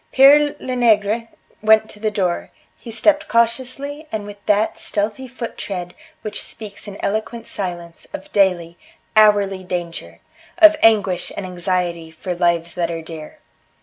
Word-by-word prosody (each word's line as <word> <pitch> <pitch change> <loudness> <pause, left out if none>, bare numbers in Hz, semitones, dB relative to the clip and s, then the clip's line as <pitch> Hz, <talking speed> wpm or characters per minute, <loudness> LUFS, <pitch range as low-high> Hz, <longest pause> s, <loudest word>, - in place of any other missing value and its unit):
Pere 290 +2 +6
Lenegre 230 -3 +1 0.3
went 220 0 +5
to 210 - -15
the 215 0 0
door; 185 -4 -1 0.3
he 235 - -11
stepped 295 +7 +2
cautiously 260 +6 -1
and 210 -2 -3
with 205 -1 -11
that 210 +1 +2
stealthy 215 +5 -2
foot 240 -1 -7
tread 180 -3 -5 0.3
which 210 -1 -5
speaks 210 -2 -8
in 200 -1 -8
eloquent 220 +3 -3
silence 175 -3 -6
of 300 0 -8
daily, 175 -4 +1 0.4
hourly 205 -3 +4
danger, 175 -2 -5 0.4
of 320 -2 +8
anguish 200 -5 +3
and 200 - -4
anxiety 175 -2 -2
for 165 +3 -5
lives 170 -1 0
that 170 -2 -1
are 165 -1 -4
dear. 160 -1 -9
205 Hz, 145 wpm, -20 LUFS, 180-230 Hz, 0.4 s, of